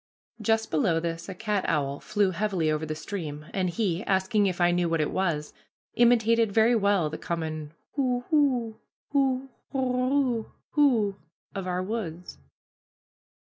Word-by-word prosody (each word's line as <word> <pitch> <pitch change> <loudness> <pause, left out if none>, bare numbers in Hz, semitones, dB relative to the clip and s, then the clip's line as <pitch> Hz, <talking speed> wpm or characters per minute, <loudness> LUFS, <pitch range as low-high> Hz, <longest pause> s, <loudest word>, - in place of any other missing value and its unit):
Just 225 -1 +1
below 165 +1 +2
this 165 +2 -4
a 190 - -5
cat 210 0 -1
owl 140 -3 0
flew 205 -3 +1
heavily 185 -4 0
over 155 +1 -1
the 155 - -3
stream, 155 -3 -6
and 185 -2 0
he, 185 -1 -1
asking 195 +2 +2
if 185 -2 -2
I 175 0 +4
knew 175 -1 +1
what 165 0 +1
it 150 - 0
was, 160 -6 -1 0.4
imitated 230 -2 +4
very 225 +3 +4
well 200 -6 +2
the 155 - -5
common 155 -2 -4 0.2
hoo, 250 -3 0
hoo, 250 -7 +2 0.3
hoo, 270 -2 +1 0.2
hoorer, 255 -2 +1 0.3
hoo, 230 -9 +3 0.4
of 195 -2 -4
our 180 0 -1
woods. 180 - -5
195 Hz, 145 wpm, -27 LUFS, 165-230 Hz, 0.4 s, I